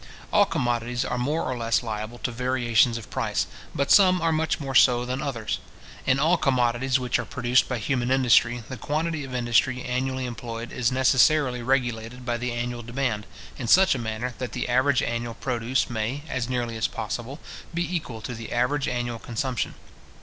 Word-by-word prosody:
All 205 - +6
commodities 120 - -1
are 125 - -2
more 150 +6 0
or 130 - -2
less 115 0 +1
liable 110 +1 -5
to 125 - -1
variations 120 -1 +2
of 110 - -10
price, - - 0 0.3
but 140 0 0
some 185 -2 +6
are 165 -1 +1
much 160 0 0
more 135 -3 -4
so 125 -2 +5
than 130 +2 -3
others. 115 -6 -3 0.5
In 130 0 +4
all 160 +6 +3
commodities 130 -2 +2
which 125 -1 0
are - - -1
produced 125 -1 +1
by 125 - -1
human 120 +2 -1
industry, 120 -2 +4
the 130 - -6
quantity 155 +4 -2
of 130 -2 -6
industry 125 +1 +2
annually 130 +1 -2
employed 115 -1 -6
is 125 -1 0
necessarily 130 0 +3
regulated 120 -1 -1
by 120 -1 0
the 125 +1 -3
annual 120 0 -3
demand, 120 -3 -2 0.3
in 120 - -3
such 190 +9 +6
a 130 - -3
manner 115 +2 -3
that 125 -2 -4
the 125 - -2
average 130 +2 +3
annual 120 -1 -3
produce 125 0 -1
may, 120 +5 -3
as 130 -4 -2
nearly 120 -2 -2
as 110 - +1
possible, 120 +6 -5 0.3
be 175 +1 -2
equal 120 -9 -4
to 125 - -5
the 115 -1 -8
average 125 +4 +1
annual 120 -1 -2
consumption. 120 +1 -3
125 Hz, 185 wpm, -25 LUFS, 120-135 Hz, 0.5 s, All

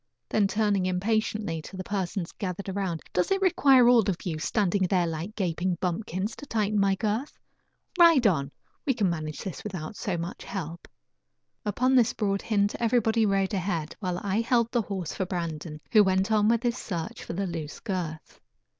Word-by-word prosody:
Then 205 -2 +3
turning 205 -3 +1
impatiently 205 -2 -1
to 190 - -10
the 185 - -4
persons 190 -3 -3
gathered 195 0 -5
around: 190 -4 -2
"Does 180 - +1
it 390 - +2
require 275 -9 +5
all 245 -1 +7
of 180 - -3
you, 160 -4 -2
standing 195 +2 +1
there 180 -1 +2
like 165 +6 -4
gaping 180 -1 -1
bumpkins, 185 +3 -2
to 290 - -9
tighten 210 -2 0
my 195 -1 +3
girth? 220 +7 -2 0.6
Ride 330 -7 +7
on; 145 -9 +2 0.3
we 270 - +1
can 200 -6 +2
manage 155 -2 -4
this 190 -5 -6
without 185 -3 -5
so 190 -3 -2
much 170 +3 -5
help." 170 -3 -6 0.8
Upon 255 +6 +2
this 245 -4 +4
broad 200 -2 -1
hint 205 -2 +1
everybody 230 -2 +2
rode 195 0 +1
ahead 175 -5 -2
while 180 -3 -2
I 200 +2 +1
held 235 0 +2
the 240 - +2
horse 190 -6 -4
for 190 - -2
Brandon, 165 -3 -4
who 215 -2 +7
went 190 +2 +1
on 210 -1 +4
with 230 +1 +2
his 240 -1 0
search 170 -5 -5
for - - -6
the 195 +3 -1
loose 165 -4 -5
girth. 175 -7 -5
195 Hz, 180 wpm, -27 LUFS, 175-220 Hz, 0.8 s, all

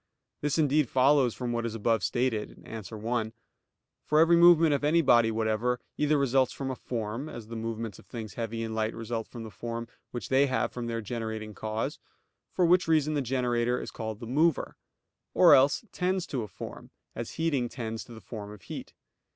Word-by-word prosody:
This 150 +1 0
indeed 150 -3 +3
follows 130 -2 +4
from 125 -2 -3
what 120 0 -1
is 115 -1 -3
above 115 -1 +1
stated 120 -4 -1
(A. 110 0 -7
1). 110 0 -2 0.7
For 150 - +2
every 165 +1 +6
movement 170 -2 +7
of 140 - 0
any 165 +3 +4
body 120 -4 +5
whatever, 110 +2 0 0.2
either 150 0 +2
results 135 -2 +2
from 135 -1 -4
a - - -3
form, 115 +4 -4
as 115 -5 -9
the 115 - -6
movements 115 -2 -4
of - - -18
things 110 -5 -7
heavy 115 +1 -3
and 110 -1 -4
light 110 0 -1
result 115 0 -4
from 120 -2 -8
the 110 - -8
form 115 +1 -5 0.2
which 120 - -6
they 135 +2 +4
have 130 - 0
from 120 -1 -5
their 115 -1 -2
generating 110 -1 -4
cause, 110 +2 -3 0.5
for 180 - +2
which 180 +1 +4
reason 155 -2 +3
the 145 - +1
generator 125 -1 0
is - - -6
called 110 -1 -5
the - - -7
mover; 150 +6 +1 0.6
or 175 -4 +8
else 140 - +4
tends 185 0 0
to 135 -8 -3
a 110 - -5
form, - - -9 0.2
as - - -6
heating 145 -7 0
tends 115 -3 -5
to - - -15
the 110 -1 -10
form 105 -3 -7
of 105 -2 -12
heat. - - -8
120 Hz, 200 wpm, -29 LUFS, 110-140 Hz, 0.7 s, or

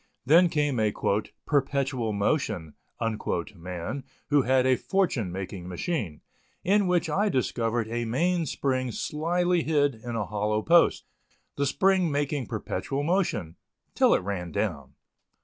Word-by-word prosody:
Then 170 +6 +6
came 145 -6 0
a 110 -1 +2 0.5
"perpetual 135 -5 0
motion" 100 - -1 0.8
man 90 +9 -5 0.3
who 145 -1 +5
had 130 0 +3
a 130 0 +4
fortune 150 - 0
making 95 -1 -6
machine, 90 - -3 0.4
in 200 +1 +3
which 180 -1 +2
I 200 +7 +1
discovered 115 - 0
a 120 +1 -2
main 165 +8 +1
spring 130 -2 -1
slyly 175 +7 0
hid 145 -3 +2
in 115 +1 -7
a 110 -3 -1
hollow 105 +2 -1
post, 170 +1 +4 0.5
the 140 0 0
spring 190 +4 +3
making 145 -3 -1
perpetual 140 +1 -3
motion 145 - 0 0.4
till - - +4
it - - -1
ran 90 -3 -4
down. 75 -7 -3
130 Hz, 130 wpm, -27 LUFS, 105-160 Hz, 0.8 s, Then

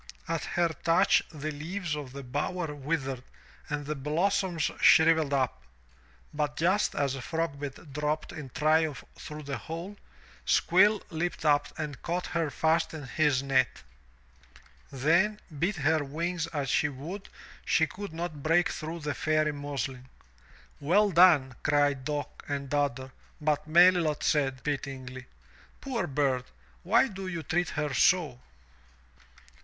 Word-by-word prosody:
At 165 -1 -2
her 170 -1 +3
touch 165 +5 +3
the 155 -1 -5
leaves 165 +3 -4
of 145 -4 -7
the 140 +1 -8
bower 150 +5 -3
withered 135 -3 -3 0.5
and 145 0 -3
the 150 - -2
blossoms 170 +4 0
shrivelled 160 -2 +6
up. 130 -3 0 0.7
But 150 0 -2
just 185 +6 +2
as 140 -2 0
Frogbit 145 0 -4
dropped 150 +1 -2
in 150 -4 -8
triumph 155 0 +1
through 150 0 -8
the 140 -1 -4
hole. 170 +6 -7 0.5
Squill 200 - +4
leapt 165 0 -3
up 145 -1 +4
and 150 -3 -5
caught 175 +1 -2
her 165 -3 -1
fast 160 +3 +1
in 155 - -7
his 135 0 +1
net. 130 -2 +1 1.1
Then, 170 +10 +2 0.2
beat 185 +6 +1
her 155 -1 +1
wings 165 +4 -2
as 145 -4 -3
she 150 - +2
would, 160 +9 -8 0.3
she 160 - +3
could 200 +4 -8
not 160 -2 -5
break 165 +4 +3
through 165 +1 -5
the 150 -1 -2
Fairy 155 -1 +1
muslin. 135 -3 -5 0.7
"Well 195 +8 +3
done," 160 -7 +6
cried 145 -3 +2
Dock 145 -1 -4
and 140 -1 -3
Dodder, 135 -3 -1 0.3
but 150 -1 0
Melilot 170 -2 +4
said, 135 -4 +1
pityingly, 130 -3 -5 0.5
"Poor 240 -9 -2
bird! 135 -3 0 0.4
Why 265 - +4
do 195 -3 -7
you 170 -3 -4
treat 175 +4 0
her 150 -2 -1
so?" 155 -2 +3
155 Hz, 135 wpm, -29 LUFS, 140-170 Hz, 1.1 s, shrivelled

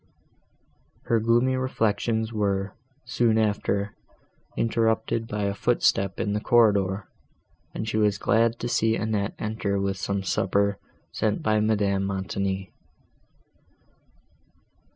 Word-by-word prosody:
Her 115 - +1
gloomy 120 +4 +2
reflections 110 -2 -1
were, 100 -2 -1 0.3
soon 120 -2 +2
after, 105 -1 0 0.6
interrupted 115 0 0
by 105 -2 -3
a 100 0 0
footstep 95 -1 +1
in 105 - -1
the 105 - 0
corridor, 100 -4 +2 0.7
and 110 - -4
she 110 - -1
was 105 -2 +2
glad 115 +3 +2
to 120 - -2
see 115 -2 +2
Annette 110 -2 -2
enter 105 -2 -2
with 95 0 -1
some 100 +1 -2
supper, 100 +2 0 0.3
sent 105 -1 -1
by 110 0 +2
Madame 100 -2 +1
Montoni. 95 0 -3
105 Hz, 110 wpm, -25 LUFS, 100-110 Hz, 0.7 s, gloomy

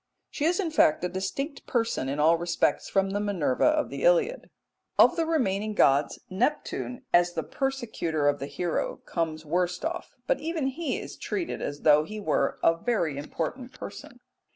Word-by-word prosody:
She 295 - -2
is, 345 +4 +2
in 350 -5 -1
fact, 160 - +4
a 180 - 0
distinct 275 - -4
person 230 - 0
in 140 +2 -2
all 160 +3 +5
respects 170 +1 0
from 195 0 +1
the 205 - -1
Minerva 190 -11 +1
of 305 -1 +2
the - - -5
Iliad. - - +2 0.5
Of - - +6
the 330 -1 0
remaining 215 -9 0
gods 140 -3 +3
Neptune, 250 +3 -2
as 175 0 +4
the 160 - -2
persecutor 220 - -2
of 145 0 +2
the 140 - -4
hero, 165 +4 -2
comes 160 -2 -2
worst 180 - -1
off; 345 +2 -4
but - - +1
even 320 -2 -2
he 315 +4 -2
is - - -8
treated 360 -4 -3
as 145 0 -4
though 150 -1 +6
he 215 +7 -7
were 205 - 0
a 165 - +6
very 170 - 0
important 245 - -4
person. - - -9
195 Hz, 175 wpm, -27 LUFS, -, 0.5 s, Of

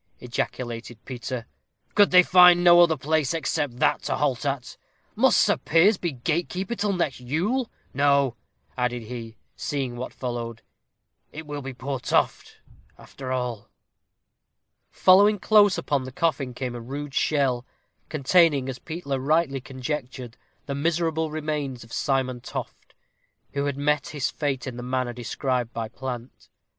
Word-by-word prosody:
ejaculated 120 -1 -4
Peter; 125 -1 -5 0.5
"could 205 -1 +5
they 180 0 +7
find 180 -1 +7
no 175 0 +8
other 165 -2 +4
place 155 +1 0
except 145 -4 -2
that - - +2
to - - -2
halt 140 -2 0
at? 135 -3 -3 0.4
Must - - +4
Sir - - +3
Piers 180 +7 +4
be 175 - -1
gatekeeper 170 - -2
till 210 -3 0
next 165 -8 -1
Yule! 185 - -1 0.2
No," 140 -2 +3 0.4
added 125 -1 -1
he, 115 -1 -8 0.2
seeing 135 -4 -3
what 125 +1 -5
followed; 120 -2 -5 0.7
"it 155 +1 -8
will 145 -1 -5
be 135 -1 -7
poor 135 +1 -4
Toft, - - 0 0.4
after 130 -2 -8
all." 125 -4 -3 1.2
Following 205 +3 +5
close 205 0 +5
upon 140 -3 -1
the 130 - -7
coffin 135 -4 -1
came 125 -1 -4
a 120 - -6
rude 140 +4 -6
shell, 135 -6 +1 0.5
containing, 155 -2 +3
as 130 -1 -5
Peter 155 -5 -4
rightly 140 -1 +1
conjectured, 130 -2 -5 0.3
the 140 - -3
miserable 160 +1 0
remains 150 -5 -3
of 115 - -14
Simon 130 -3 0
Toft, - - -8 0.6
who 140 0 -1
had 140 -1 -2
met 145 0 +1
his 145 -3 -2
fate 140 -3 -2
in 125 -3 -6
the - - -5
manner 125 0 -2
described 125 0 -2
by 115 -1 -3
Plant. 125 +1 -8
140 Hz, 145 wpm, -25 LUFS, 125-160 Hz, 1.2 s, no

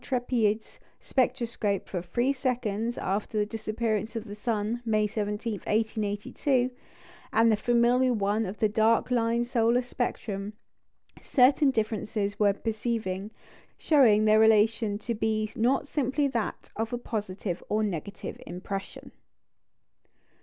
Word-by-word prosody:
Trépied's 235 -4 -1 0.2
spectroscope 235 -6 -1
for 180 - -3
three 240 +10 0
seconds 240 -4 -2
after 205 +3 -2
the 210 - +2
disappearance 220 0 -2
of 225 - -3
the 205 -2 -9
sun, 215 +2 -2
May 215 -2 +2
17, 210 0 -3
1882, 220 +4 0 0.6
and 225 +1 +4
the - - +4
familiar 240 +3 +3
one 210 -1 0
of 195 +3 -6
the 215 - +3
dark 220 +3 +2
line 235 0 +1
solar 240 0 +2
spectrum, 210 -4 -3 0.7
certain 270 +2 +4
differences 215 -3 -2
were 205 -2 +4
perceiving, 215 -3 -3 0.5
showing 230 -9 +4
their 215 0 +5
relation 220 -1 +4
to 235 +3 -3
be 215 -1 -1
not 255 +5 +1
simply 285 0 0
that 230 -4 -3
of 225 +1 -2
a 245 - -1
positive 205 -6 -4
to 210 - 0
a 215 - +1
negative 200 0 -5
impression. 195 +3 -6
220 Hz, 125 wpm, -28 LUFS, 210-240 Hz, 0.7 s, their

